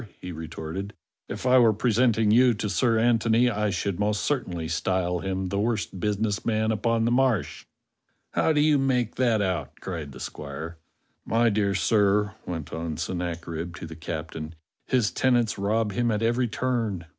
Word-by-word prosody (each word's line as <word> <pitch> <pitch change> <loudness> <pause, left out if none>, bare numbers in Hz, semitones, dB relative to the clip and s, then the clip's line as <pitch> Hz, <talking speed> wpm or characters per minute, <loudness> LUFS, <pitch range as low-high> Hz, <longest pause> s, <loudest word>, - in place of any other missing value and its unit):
he 90 - -7
retorted, 80 +4 -6 0.3
"if - - -6
I 130 0 +6
were 115 -3 +5
presenting 110 -1 +2
you 120 +1 +5
to 105 0 -3
Sir 115 +2 +2
Antony 115 +1 +3
I 105 -1 0
should 90 -1 -2
most 105 0 +1
certainly 90 - -2
style 90 +2 0
him 95 0 -3
the 100 - -1
worst 105 -3 -1
business 105 +1 -1
man 110 -1 +1
upon 115 +1 +1
the 120 - +1
Marsh." 125 - +1 0.6
"How - - +2
do 150 -1 +3
you 150 -1 +4
make 125 -4 +1
that 115 -4 +2
out?" 90 -8 -3
cried 80 -6 -5
the 65 - -11
squire. 80 +5 -7 0.4
"My 115 +1 +2
dear 100 -2 +1
sir," 105 0 +2
went 80 -4 -5
on 80 -1 -4
Sennacherib 85 -1 -4
to 85 - -7
the 80 0 -9
captain, 80 0 -6 0.3
"his 120 -8 +2
tenants 120 -1 +1
rob 105 +2 +1
him 120 +4 0
at 110 0 0
every 120 +2 +2
turn. 115 -7 -2
105 Hz, 170 wpm, -26 LUFS, 85-115 Hz, 0.6 s, I